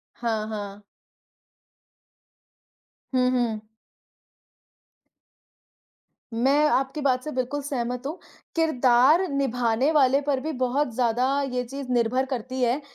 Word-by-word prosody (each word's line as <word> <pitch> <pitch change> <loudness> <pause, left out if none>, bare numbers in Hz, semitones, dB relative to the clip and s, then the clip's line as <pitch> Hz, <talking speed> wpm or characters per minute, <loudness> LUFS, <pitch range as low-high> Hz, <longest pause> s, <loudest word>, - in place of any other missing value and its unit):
हाँ, 220 -3 -2
हाँ। 205 -1 -6 2.3
हुँ, 250 0 +3
हुँ। 235 -4 0 2.7
मैं 275 +6 +3
आपकी 270 +3 0
बात 255 -2 +1
से 305 - -4
बिल्कुल 260 +3 -2
सहमत 250 -2 -3
हूँ। 320 +5 -5 0.4
किरदार 290 +2 +4
निभाने 255 -1 +1
वाले 275 -2 +4
पर 275 -3 +1
भी 315 +2 -3
बहुत 255 0 0
ज़्यादा 250 +3 +1
ये 250 0 0
चीज़ 270 +1 -7
निर्भर 245 +2 +1
करती 260 0 -4
है 245 +4 +1
255 Hz, 105 wpm, -25 LUFS, 240-280 Hz, 2.7 s, किरदार